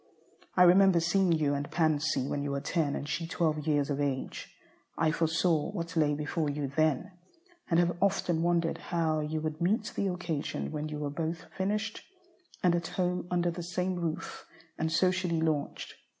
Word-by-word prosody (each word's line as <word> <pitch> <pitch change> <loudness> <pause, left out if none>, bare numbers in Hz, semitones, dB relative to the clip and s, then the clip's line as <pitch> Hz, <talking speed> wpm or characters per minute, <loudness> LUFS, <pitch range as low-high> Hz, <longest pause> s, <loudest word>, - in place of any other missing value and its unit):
I 180 - +8
remember 185 0 +6
seeing 180 +2 +2
you 155 -3 +2
and 145 0 -3
Pansy 155 -4 +1
when 145 - -2
you 145 - -2
were 140 0 -1
ten 150 -1 0
and 145 - -4
she 160 +2 -2
twelve 155 -3 0
years 145 -1 +2
of 140 +1 -1
age. 135 -2 -3 0.5
I 160 -1 +3
foresaw 165 -1 +1
what 165 0 -4
lay 150 -2 +3
before 150 +1 -1
you 145 -1 -2
then, 155 +3 +1 0.6
and 165 -1 +4
have 175 -1 +2
often 175 -4 +2
wondered 170 -1 +1
how 160 -3 0
you 155 +1 -2
would 155 0 -4
meet 210 +5 +1
the 200 - 0
occasion 175 -5 -3
when 155 0 -3
you 150 - -4
were 145 -1 -3
both 165 +2 -3
"finished," 210 +3 -1 0.6
and 180 -2 +4
at 170 -1 -1
home 180 -1 0
under 175 -1 +1
the 175 - -6
same 180 +2 -2
roof, 170 0 -4 0.3
and 160 0 -1
socially 180 0 +2
launched. 155 -3 -1
165 Hz, 180 wpm, -30 LUFS, 150-175 Hz, 0.6 s, I